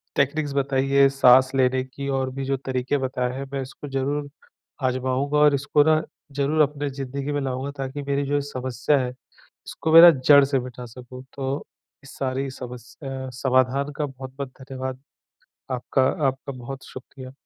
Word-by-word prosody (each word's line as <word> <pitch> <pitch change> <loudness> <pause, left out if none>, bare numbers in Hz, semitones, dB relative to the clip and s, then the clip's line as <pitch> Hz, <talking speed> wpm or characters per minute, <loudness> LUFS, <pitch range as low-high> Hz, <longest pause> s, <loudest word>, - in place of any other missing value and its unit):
Techniques 145 +1 0
बताई 135 -1 0
है, 140 0 +6
साँस 130 -1 +5
लेने 130 0 +2
की 140 +2 -7
और 135 -1 0
भी 135 +1 -5
जो 135 0 0
तरीके 130 +1 -1
बताए 130 -2 -2
हैं, 140 - -4
मैं 135 - -1
इसको 135 +3 -9
ज़रूर 140 +2 -2 0.5
आज़माऊँगा 130 +3 0
और 150 -1 +6
इसको 145 +1 +3
ना 155 0 +3 0.3
ज़रूर 145 +3 +1
अपने 145 0 0
ज़िंदगी 135 +1 -5
में 145 0 -1
लाऊँगा, 135 +1 -3
ताकि 135 +1 -4
मेरी 140 0 -1
जो 145 +1 +1
समस्या 130 0 -1
है 125 -1 -1
इसको 160 +4 -7
मैं 165 - +11
ना 175 - +11 0.2
जड़ 140 -1 +9
से 135 -1 +1
मिटा 125 0 -8
सकूँ। 125 +2 -11
तो 135 +1 -3 0.4
इस 135 - -13
सारी 135 0 -2
समस्या 130 +2 -8
समाधान 130 +2 +2
का 150 - 0
बहुत-बहुत 135 0 -7
धन्यवाद। 130 -1 -6 0.7
आपका 130 +1 0 0.2
आपका 135 +1 -3
बहुत 130 +2 -8
शुक्रिया। 130 0 -10
135 Hz, 165 wpm, -24 LUFS, 130-140 Hz, 0.7 s, मैं